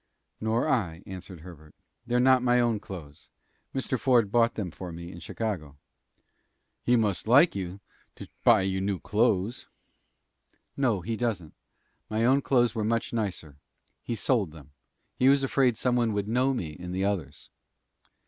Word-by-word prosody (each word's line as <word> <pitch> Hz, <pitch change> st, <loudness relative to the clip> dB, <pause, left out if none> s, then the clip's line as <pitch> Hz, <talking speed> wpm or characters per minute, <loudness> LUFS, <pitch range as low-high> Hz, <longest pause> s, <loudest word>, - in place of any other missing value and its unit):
"Nor 110 Hz, +5 st, 0 dB
I," 95 Hz, -, -1 dB
answered 95 Hz, -2 st, -9 dB
Herbert. 75 Hz, -3 st, -13 dB, 0.3 s
"They're 120 Hz, +1 st, +2 dB
not 130 Hz, 0 st, +5 dB
my 125 Hz, 0 st, +3 dB
own 120 Hz, -3 st, +1 dB
clothes. 80 Hz, -8 st, -10 dB, 0.4 s
Mr. 130 Hz, -1 st, -2 dB
Ford 120 Hz, -6 st, +3 dB
bought 115 Hz, 0 st, +3 dB
them 95 Hz, -5 st, -4 dB
for 90 Hz, +1 st, -8 dB
me 85 Hz, +1 st, -8 dB
in 85 Hz, -, -10 dB
Chicago." 85 Hz, -6 st, -4 dB, 1.0 s
"He 125 Hz, -, +3 dB
must 105 Hz, -4 st, 0 dB
like 140 Hz, -, +6 dB
you, 95 Hz, 0 st, -5 dB, 0.3 s
to -, -, -10 dB, 0.2 s
buy 110 Hz, -5 st, +5 dB
you 95 Hz, 0 st, -1 dB
new 100 Hz, -1 st, -1 dB
clothes." 105 Hz, +1 st, 0 dB, 1.1 s
"No, 120 Hz, -9 st, +1 dB
he 115 Hz, +6 st, -3 dB
doesn't. 105 Hz, -9 st, -3 dB, 0.6 s
My 110 Hz, +1 st, 0 dB
own 135 Hz, +3 st, +4 dB
clothes 120 Hz, -4 st, +2 dB
were 110 Hz, -3 st, -2 dB
much 115 Hz, +2 st, -1 dB
nicer. 90 Hz, -10 st, -3 dB, 0.4 s
He 120 Hz, -, -4 dB
sold 110 Hz, -, +1 dB
them. 75 Hz, -2 st, -14 dB, 0.5 s
He 130 Hz, -, +5 dB
was 140 Hz, 0 st, +4 dB
afraid 130 Hz, -3 st, +2 dB
some 125 Hz, -1 st, +1 dB
one 115 Hz, -3 st, +1 dB
would 100 Hz, 0 st, -2 dB
know 125 Hz, +4 st, +2 dB
me 90 Hz, -12 st, -3 dB
in 90 Hz, +3 st, -8 dB
the 95 Hz, +1 st, 0 dB
others." 100 Hz, -4 st, -4 dB
110 Hz, 160 wpm, -27 LUFS, 90-120 Hz, 1.1 s, like